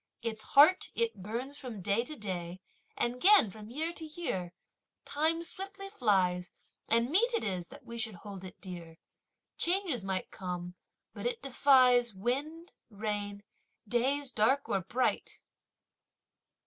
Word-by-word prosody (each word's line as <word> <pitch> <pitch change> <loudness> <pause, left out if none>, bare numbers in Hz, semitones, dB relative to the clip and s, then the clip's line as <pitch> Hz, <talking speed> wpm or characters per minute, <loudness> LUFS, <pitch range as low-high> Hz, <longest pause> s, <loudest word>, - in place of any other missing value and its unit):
Its 220 -2 -3
heart, 305 +10 +5
it 465 -1 +1
burns 245 +8 -4
from 245 -7 -6
day 200 +5 +1
to 305 +5 -7
day 185 -5 -4 0.4
and 245 +1 -1
'gain 390 - +7
from 215 +2 -11
year 315 +7 -2
to 330 - -7
year! 305 - -3 0.5
Time 320 +3 +1
swiftly 390 +3 -6
flies 190 - +1 0.4
and 230 +3 +3
mete 465 +8 +4
it - - 0
is 180 -4 -2
that - - -13
we 235 -1 -7
should 225 -3 -1
hold 195 +1 -9
it 185 - -10
dear! 170 -3 -8 0.6
Changes 345 - +1
might 190 -1 -2
come, 180 -1 -5 0.4
but - - -3
it 485 -1 -3
defies 250 -4 +5
wind, 285 - -3 0.2
rain, 205 -1 -4 0.4
days 265 +4 +1
dark 255 +6 +2
or 195 - 0
bright! 240 +8 -1
235 Hz, 140 wpm, -31 LUFS, 195-305 Hz, 0.6 s, gain